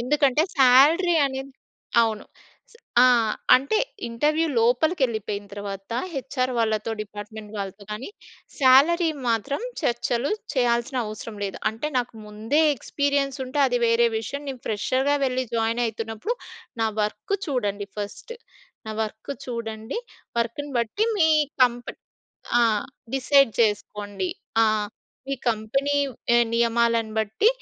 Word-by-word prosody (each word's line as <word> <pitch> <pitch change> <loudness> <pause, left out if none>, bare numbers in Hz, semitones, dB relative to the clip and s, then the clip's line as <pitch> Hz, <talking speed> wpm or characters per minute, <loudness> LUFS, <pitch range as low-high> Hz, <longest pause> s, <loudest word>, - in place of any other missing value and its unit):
ఎందుకంటే 280 +3 +2 0.2
సాలరీ 290 +8 +6
అనేది 270 0 -6 0.5
అవును. 220 -2 -1 0.5
స్ - - -22 0.3
ఆ! - - +8 0.5
అంటే 275 +12 +2 0.3
ఇంటర్‌వ్యూ 300 +8 +1
లోపలికెళ్ళిపోయిన 235 - +1
తర్వాత, 200 0 -7 0.2
హెచ్‌ఆర్ 260 -2 -2
వాళ్ళతో, 220 -1 0
డిపార్ట్‌మెంట్ 210 0 -8
వాళ్ళతో 200 0 -6
కానీ, 220 +5 -6 0.5
సాలరీ 295 +6 +5 0.2
మాత్రం 255 - -1 0.2
చర్చలు 240 -2 0 0.2
చేయాల్సిన 245 +1 +1
అవసరం 215 +1 -7
లేదు. 195 - -5
అంటే 225 +7 -4
నాకు 245 -1 -3
ముందే 220 +8 0
ఎక్స్‌పీరియన్సుంటే 275 0 -1
అది 245 -1 +1
వేరే 230 +1 +4
విషయం. 280 +6 -5
నేను 260 -3 -6
ఫ్రెషర్‌గా 260 +7 +1
వెళ్ళి 260 0 0
జాయిన్ 230 +1 +1
అయితున్నప్పుడు, 225 - -4 0.5
నా - - +3 0.2
వర్క్ 210 - -2
చూడండి 205 -6 -2
ఫస్ట్. 210 - -6 0.5
నా - - -3
వర్క్ 220 +5 -7
చూడండి. 225 - -4 0.4
వర్క్‌ని 260 +5 -3
బట్టి 235 - 0
మీ 320 -3 +5 0.4
కంపెనీ 240 0 -4 0.6
ఆ! - - +5 0.5
డిసైడ్ 270 -2 +4
చేసుకోండి. 205 -3 -1 0.4
ఆహ్, 215 -1 +1 0.4
ఈ - - -2
కంపెనీ 255 +6 0 0.6
నియమాలను 230 -1 +2
బట్టి, 220 - +1
235 Hz, 115 wpm, -24 LUFS, 220-275 Hz, 0.6 s, ఆ